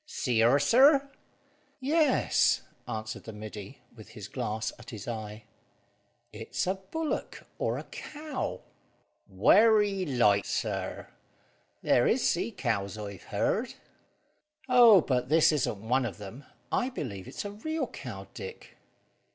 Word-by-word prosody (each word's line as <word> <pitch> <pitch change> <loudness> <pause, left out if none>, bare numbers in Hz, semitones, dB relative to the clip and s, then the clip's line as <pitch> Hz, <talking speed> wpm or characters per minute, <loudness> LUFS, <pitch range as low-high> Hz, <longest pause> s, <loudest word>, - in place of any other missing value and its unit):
"See 125 - -1
her, 120 +5 +5
sir?" 275 - +5 0.7
"Yes," 290 +1 +2 0.2
answered 110 +1 -5
the 110 - -7
middy, 105 -1 -9
with - - -13
his - - -9
glass 110 +1 -3
at 120 -1 -12
his 105 -3 -8
eye. 110 -2 -6 0.9
"It's - - -3
a 185 - +1
bullock 295 +12 -5
or - - 0
a - - -5
cow." 300 -2 -6 0.7
"Werry 205 - +4
like, 105 -7 +3
sir. 95 -5 -3 0.7
There 120 - +3
is 245 - +2
sea 185 +6 0
cows, 110 - -2
I've 100 -3 -8
heared." 220 - -1 0.9
"Oh, 240 -6 +7
but 125 -3 -1
this 160 +1 +5
isn't 110 -8 -2
one 125 +1 +2
of 95 -6 -8
them. 105 +7 -10 0.3
I 250 - +1
believe 105 - -6
it's - - -6
a 205 - -4
real 315 +10 -3
cow, - - -8
Dick." 465 0 -9
135 Hz, 130 wpm, -29 LUFS, -, 0.9 s, Oh